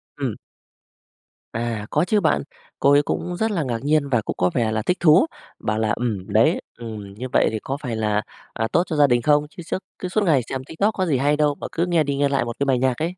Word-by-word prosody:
Ừm. - - -3 1.2
À, 115 -2 -3
có 150 +3 +2
chứ 210 +4 +2
bạn. 165 - +1 0.4
Cô 140 - +4
ấy 145 0 +6
cũng 175 +4 -3
rất 220 +1 0
là 175 -6 0
ngạc 120 -4 -2
nhiên 145 -1 +2
và 120 -4 +2
cũng - - -4
có 90 - +2
vẻ 115 -3 +1
là 110 - 0
thích 180 - 0
thú, 160 - +6 0.3
bảo 105 0 -1
là 110 -1 0
"Ừm, 110 -6 -3
đấy, - - +4 0.2
ừm, 110 -4 -8
như 125 +6 -6
vậy - - +4
thì 110 - -3
có 135 +5 -4
phải 125 -5 -3
là, 105 -1 0 0.3
à, 110 - -1
tốt 170 - +3
cho 160 - -2
gia 145 -1 +5
đình 120 -2 +2
không. 150 +1 +3
Chứ 175 - -10
suốt 165 - -2 0.2
cứ 185 - -3
suốt 205 +3 0
ngày 155 -8 +3
xem 130 -1 -3
TikTok 195 +10 0
có 185 - -1
gì 150 -6 +1
hay 145 +3 +2
đâu 150 -1 +2
mà - - -6
cứ 170 +2 0
nghe 170 -3 +2
đi 140 -1 -2
nghe 140 0 +2
lại 140 -3 +1
một 120 -1 -5
cái 140 - +1
bài 135 -2 +2
nhạc 130 -1 +1
ấy." 170 +3 -2
140 Hz, 265 wpm, -22 LUFS, 115-160 Hz, 1.2 s, ấy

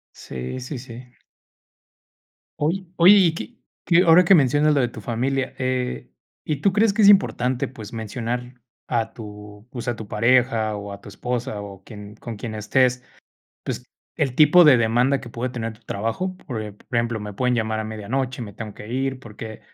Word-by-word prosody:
Sí, 65 - -6
sí, 125 +2 -6
sí. 125 0 -11 1.5
Oye, 175 +6 -1
oye, 180 +4 +8
¿y 175 -5 +4
qué 240 +8 -8 0.3
qué? 170 0 +5
Ahora 170 +2 +7
que 195 - +6
mencionas 145 0 +4
lo 140 - +3
de 125 - +2
tu 115 - -10
familia, 130 +5 -2
eh, 130 -1 -2 0.3
¿y 155 - -1
tú 195 - +3
crees 215 +2 +3
que 215 +2 +1
es 200 - +8
importante, 130 - +3
pues, 110 -5 -10
mencionar 120 +2 -5 0.3
a 115 -2 -1
tu, 105 -1 -11
pues, 125 -4 -6
a 120 - -1
tu 110 - -8
pareja 115 -1 +2
o 100 0 -7
a 100 - -9
tu - - -13
esposa 120 -4 -4
o 100 -1 -10
quien 105 -1 -11
con 115 -2 -7
quien 110 +1 -6
estés, 125 +4 +1 0.6
pues, - - -4 0.3
el 135 -4 0
tipo 155 +5 +7
de 145 -4 +8
demanda 120 +4 +2
que - - -10
puede 120 +2 -4
tener 115 -3 -4
tu 110 - -24
trabajo? 115 - -3
Por 115 -5 -4
ep 105 -1 -10
ejemplo, 115 -2 0
me 105 -1 -7
pueden 125 +4 +1
llamar 110 -2 -1
a 110 - -2
medianoche, 120 +4 -3
me 105 -3 -8
tengo 110 -2 -7
que 105 - -10
ir, 135 0 -2
porque, 110 -2 -9
120 Hz, 190 wpm, -23 LUFS, 110-135 Hz, 1.5 s, oye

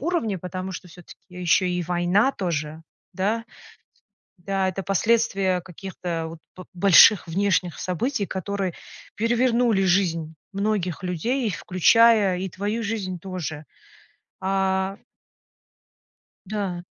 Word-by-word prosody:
уровне, 270 - -1
потому 185 +2 -5
что 180 - -8
всё-таки 175 +1 -14 0.3
еще 180 +2 +3
и 180 0 -1
война 180 +8 +2
тоже, 160 -3 -3 0.3
да? 215 +4 -1 0.9
Да, 190 +1 -1
это 190 +1 -5
последствия 195 -2 +1
каких-то 175 -2 -5
вот 165 0 -10 0.2
бо 185 - -10
больших 190 +1 +6
внешних 180 -2 0
событий, 210 - -1
которые 190 -1 -3 0.4
перевернули 235 -2 +2
жизнь 165 -4 +1 0.2
многих 200 -4 -1
людей, 230 - -1
и 210 - -1
включая 200 +2 +4
и 190 0 -3
твою 205 +5 -3
жизнь 195 -4 -3
тоже. 160 -5 -6 0.8
А 190 0 0 1.5
Да. 190 -4 -3
190 Hz, 110 wpm, -24 LUFS, 175-205 Hz, 1.5 s, больших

